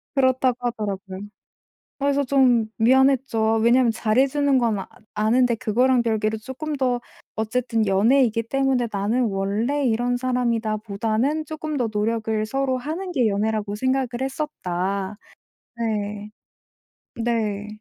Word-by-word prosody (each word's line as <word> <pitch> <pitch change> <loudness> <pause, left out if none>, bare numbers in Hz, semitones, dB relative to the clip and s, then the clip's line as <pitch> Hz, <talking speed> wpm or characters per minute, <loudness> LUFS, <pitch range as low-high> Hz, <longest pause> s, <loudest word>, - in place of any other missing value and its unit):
그렇다고 260 -2 +3
하더라고요. 200 -5 -4 0.8
그래서 280 0 +1
좀 250 -4 +4
미안했죠. 265 0 +3
아 225 - +3
왜냐하면 235 +1 +4
잘 220 +1 -1
해 275 - +5
주는 285 -1 +2
건 230 -4 +1
아 - - -7 0.3
아는데 235 +3 +3
그거랑 245 +4 +2
별개로 220 -1 0
쪼끔 265 +6 -5
더 250 -3 0 0.4
어쨌든 225 0 0
연애이기 230 +3 +3
때문에 265 0 +1
'나는 210 +5 0
원래 215 +9 -1
이런 245 +2 +1
사람이다.'보다는 230 +2 -1
쪼끔 310 -1 -4
더 240 -3 0
노력을 220 0 0
서로 265 +2 -1
하는 330 +8 -4
게 250 -6 +2
연애라고 210 0 -1
생각을 260 +2 0
했었다. 200 - -3 0.6
네. 210 -2 -3 0.9
네. 220 -3 -1
235 Hz, 290 characters per minute, -23 LUFS, 215-260 Hz, 0.9 s, 해